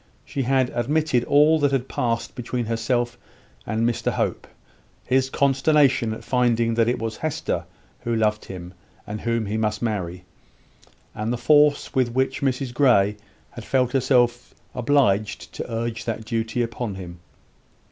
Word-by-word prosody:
She 140 - -3
had 130 0 +1
admitted 130 0 +1
all 150 +2 +5
that 145 -2 +2
had 135 -2 0
passed 115 -1 -2
between 125 0 -3
herself 120 +2 -1 0.5
and 110 +2 +1
Mr 120 - 0
Hope - - -2 0.6
his 130 +1 +2
consternation 135 -3 +3
at 110 - -6
finding 120 -2 +1
that 115 0 +2
it 120 - +1
was 115 -1 -4
Hester 155 -2 -2 0.3
who 120 -1 -2
loved 105 -1 +1
him, 90 -1 -8 0.3
and 105 +1 -6
whom 115 -1 0
he 105 +2 -2
must 110 0 -1
marry, 90 -5 -3 0.9
and 110 +2 -3
the 120 - -1
force 145 +4 +3
with 125 -3 +1
which 130 +1 0
Mrs 130 -2 -1
Grey 110 -6 +4 0.4
had - - -9
felt 125 -2 +1
herself 125 -2 +1 0.2
obliged 120 -5 +1
to - - -6
urge 115 0 -3
that 110 -1 -3
duty 115 +1 -1
upon 115 -3 -4
him. 90 -2 -9
120 Hz, 150 wpm, -23 LUFS, 110-130 Hz, 0.9 s, all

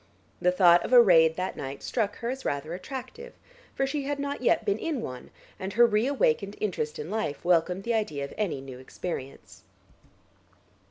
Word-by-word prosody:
The 180 - +4
thought 175 -2 +5
of - - -3
a 245 - +10
raid 165 -7 +6
that 185 +2 -3
night 135 0 -7
struck 210 -4 -1
her 235 +1 -3
as 265 0 -6
rather 145 +3 -3
attractive, 275 - -8 0.4
for 270 - +1
she 280 0 -3
had 285 0 -2
not 280 -1 -4
yet 235 - +2
been 205 0 0
in 320 -5 -2
one, 125 -1 -7 0.3
and 190 +1 -5
her 240 +3 +6
re 220 +1 +2
awakened 200 - +1
interest 170 -7 -2
in 150 +5 -6
life 190 -9 -3
welcomed 180 +2 +2
the 235 - -1
idea 155 -11 -1
of 140 - -10
any 185 -10 -2
new 130 -2 -10
experience. 135 0 -7
195 Hz, 185 wpm, -27 LUFS, 160-240 Hz, 0.4 s, a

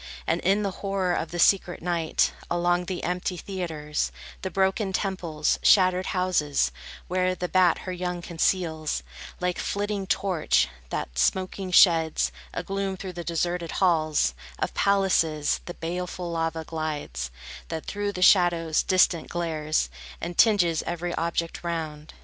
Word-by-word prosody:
And - - 0
in 200 +3 +2
the 200 - -1
horror 195 -2 0
of 160 - -2
the 175 - -5
secret 180 0 +3
night, 170 -2 +1 0.2
Along 175 +1 +1
the 180 0 -4
empty 180 +1 -2
theatres, 160 -5 -3 0.3
The 190 - -3
broken 190 +2 0
temples, 175 -7 -1
shattered 185 -2 +4
houses, 155 - +1 0.4
where 185 0 +1
The 180 - -3
bat 180 -1 +4
her 185 - -3
young 180 -1 -3
conceals, 160 - 0 0.4
Like 180 0 -1
flitting 205 -1 -2
torch, 180 - +2 0.2
that - - -4
smoking 185 - 0
sheds 165 -3 +5 0.2
A - - -4
gloom 195 -1 -2
through 185 0 -6
the 175 0 -6
deserted 170 0 -2
halls 155 - +2 0.2
Of - - -2
palaces, 180 -7 +2
the 175 - -7
baleful 175 +1 -4
lava 165 -1 -2
glides, 150 - -4 0.4
That 160 - -5
through 205 0 -3
the 180 - -1
shadows, 170 -4 +4
distant, 185 -3 +2
glares, 155 - -1 0.3
And 175 +1 -5
tinges 175 -8 +4
every 175 0 -2
object 170 0 -2
round. 155 -3 -4
175 Hz, 140 wpm, -26 LUFS, 160-185 Hz, 0.4 s, sheds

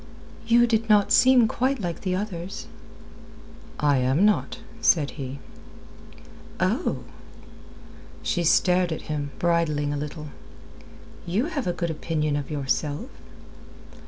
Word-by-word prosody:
"You 240 +1 +5
did 225 -1 0
not 205 -1 +4
seem 255 -3 +6
quite 260 +4 0
like 175 -4 -4
the 185 -2 -1
others." 190 0 -5 1.1
"I 145 -2 +3
am 130 +9 +2
not," 210 -1 +1 0.2
said 150 -9 +3
he. 135 -1 -6 1.2
"Oh!" - - 0 1.2
She 125 - 0
stared 180 +1 +3
at 160 - -4
him, 145 -2 -3
bridling 155 -4 +1
a - - -2
little. 150 +1 -6 1.0
"You 200 +9 0
have 280 -8 -2
a - - +2
good 170 -1 -2
opinion 155 -2 -1
of 145 -2 -3
yourself." 145 0 -2
170 Hz, 120 wpm, -25 LUFS, 150-210 Hz, 1.2 s, seem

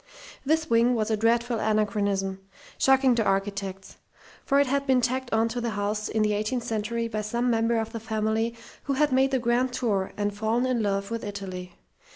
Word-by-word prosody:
This 315 +3 +1
wing 235 +2 +3
was 220 -1 -1
a - - +3
dreadful 230 +2 +1
anachronism, 200 -3 0 0.4
shocking 265 -1 +4
to 230 -1 +1
architects, 195 -1 -2 0.5
for 280 0 +2
it 285 - +4
had 280 +1 -1
been 260 -1 +4
tacked 250 +1 -1
on 225 +1 +2
to 240 +1 -3
the 235 - -1
house 210 +1 -2
in 220 -1 +1
the 210 0 +2
eighteenth 215 +4 -1
century 230 +1 -2
by 215 -2 -3
some 235 +4 0
member 230 0 +2
of 225 0 -2
the 230 - -5
family 220 +1 -1 0.3
who 280 - 0
had 295 +1 +2
made 265 +1 +3
the 265 - +1
"grand 245 +1 +1
tour" 205 -7 -1
and 205 -1 -1
fallen 220 +4 0
in 255 -3 0
love 200 0 -1
with 230 -1 -3
Italy. 190 -3 -6
225 Hz, 200 wpm, -26 LUFS, 210-245 Hz, 0.5 s, shocking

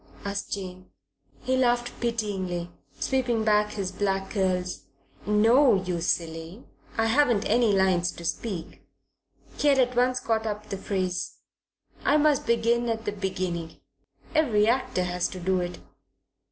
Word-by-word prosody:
asked 200 0 -4
Jane. 185 -2 -7 0.5
He 260 - +1
laughed 245 -1 +2
pityingly, 195 -7 -2 0.3
sweeping 245 -4 0
back 210 -1 +2
his 195 -3 -3
black 195 0 -1
curls. 185 -3 -1 0.4
"No, 225 +5 +5
you 180 -2 -2
silly, 165 +4 -2 0.3
I 225 - +3
haven't 235 -3 +3
any 230 0 +3
lines 185 -2 +2
to 170 - -10
speak" 180 -2 -4 0.8
he 295 - +2
had 280 -1 +5
at 250 -1 +2
once 250 +1 +2
caught 225 -1 -1
up 210 0 -5
the 195 - -3
phrase 185 -3 -2 0.7
"I 295 - +4
must 300 -4 +2
begin 235 +1 +2
at 225 0 -2
the 205 - 0
beginning. 185 -4 -4 0.5
Every 230 -10 +3
actor 235 -6 +1
has 180 0 -1
to 185 - -8
do 185 +1 +1
it." 175 0 -4
210 Hz, 140 wpm, -26 LUFS, 185-235 Hz, 0.8 s, No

